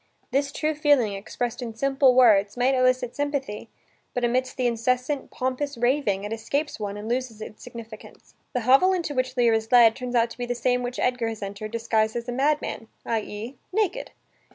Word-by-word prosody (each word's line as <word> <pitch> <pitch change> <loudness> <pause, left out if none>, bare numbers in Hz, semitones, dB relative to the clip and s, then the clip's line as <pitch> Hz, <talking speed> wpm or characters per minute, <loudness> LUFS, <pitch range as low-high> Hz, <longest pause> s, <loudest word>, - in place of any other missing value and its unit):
This 280 +2 +1
true 310 +1 -1
feeling, 290 -8 +3
expressed 225 +5 -4
in 230 -2 -6
simple 270 +1 +3
words, 210 -4 +5
might 250 +2 +3
elicit 255 -1 +1
sympathy, 280 -7 -3 0.5
but 245 - -1
amidst 255 +2 0
the 255 - 0
incessant, 250 +4 0
pompous 260 +2 -3
raving 240 -5 +1
it 210 +2 -4
escapes 280 +7 -2
one 205 -1 -4
and 210 +1 -7
loses 240 -2 -2
its 215 0 -9
significance. 230 -3 -11 0.2
The 250 - 0
hovel 270 +11 +5
into 340 -5 -2
which 255 -1 -2
Lear 235 -2 +4
is 220 0 -1
led, 235 -3 +7
turns 250 -1 -5
out 230 0 +3
to 230 - -11
be 245 - -3
the 245 - -1
same 250 +1 +1
which 245 0 -4
Edgar 250 -2 0
has 220 -2 -6
entered, 200 +2 -6
disguised 220 -1 0
as 235 0 -4
a - - -2
madman, 275 -3 -1 0.2
i.e., 225 +2 -4
naked. 435 +4 -1
245 Hz, 190 wpm, -25 LUFS, 225-265 Hz, 0.5 s, led